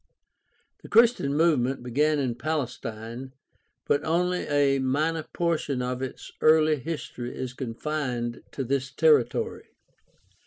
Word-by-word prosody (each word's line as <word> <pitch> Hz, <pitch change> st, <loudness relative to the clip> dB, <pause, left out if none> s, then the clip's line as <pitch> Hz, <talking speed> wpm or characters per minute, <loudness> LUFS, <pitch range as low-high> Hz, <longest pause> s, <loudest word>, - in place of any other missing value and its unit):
— -, -, -42 dB
The -, -, -12 dB
Christian 225 Hz, -, +4 dB
move 160 Hz, -3 st, +4 dB
ment 125 Hz, +1 st, -2 dB
began 150 Hz, +5 st, +2 dB
in 130 Hz, -4 st, 0 dB
Palestine, 125 Hz, -3 st, -4 dB, 0.5 s
but 145 Hz, -, +1 dB
only 180 Hz, +2 st, 0 dB
a 140 Hz, -2 st, +3 dB
minor 150 Hz, +5 st, 0 dB
portion 155 Hz, -6 st, -1 dB
of 125 Hz, 0 st, -3 dB
its 130 Hz, -, -6 dB
early 155 Hz, 0 st, +5 dB
history 130 Hz, -4 st, -6 dB
is 130 Hz, -1 st, -4 dB
confined 125 Hz, -1 st, -3 dB
^to 135 Hz, -3 st, -3 dB
this 135 Hz, 0 st, 0 dB
territory. 455 Hz, -1 st, +2 dB
140 Hz, 125 wpm, -26 LUFS, 125-155 Hz, 0.5 s, early